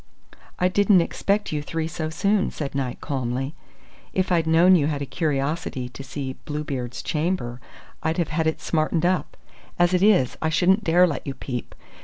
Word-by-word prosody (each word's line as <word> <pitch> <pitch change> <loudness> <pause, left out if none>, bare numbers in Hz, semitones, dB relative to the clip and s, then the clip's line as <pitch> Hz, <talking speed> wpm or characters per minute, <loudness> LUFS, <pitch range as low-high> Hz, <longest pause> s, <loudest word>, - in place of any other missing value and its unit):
"I 180 - +3
didn't 200 0 +4
expect 200 +4 -1
you 150 -1 -1
three 160 +2 -3
so 155 0 -4
soon," 200 +5 +1
said 145 -3 -5
Knight, 135 -3 -3
calmly. 135 0 -2 0.6
"If 185 0 0
I'd 165 -2 +2
known 170 +3 +6
you 150 -5 +3
had 145 -2 -2
a - - -3
curiosity 140 -2 -2
to 135 - -9
see 135 0 -5
Bluebeard's 140 -5 -4
Chamber, 150 -7 -2 0.4
I'd 160 0 -1
have 170 -4 0
had 160 0 0
it 160 - 0
smartened 160 +1 0
up. 185 +1 0 0.4
As 175 +1 +3
it 180 - +3
is, 195 - +4
I 160 - +1
shouldn't 190 +6 +3
dare 175 +1 +5
let 145 -7 -3
you 135 - -3
peep. 125 -3 -6
160 Hz, 180 wpm, -24 LUFS, 140-180 Hz, 0.6 s, known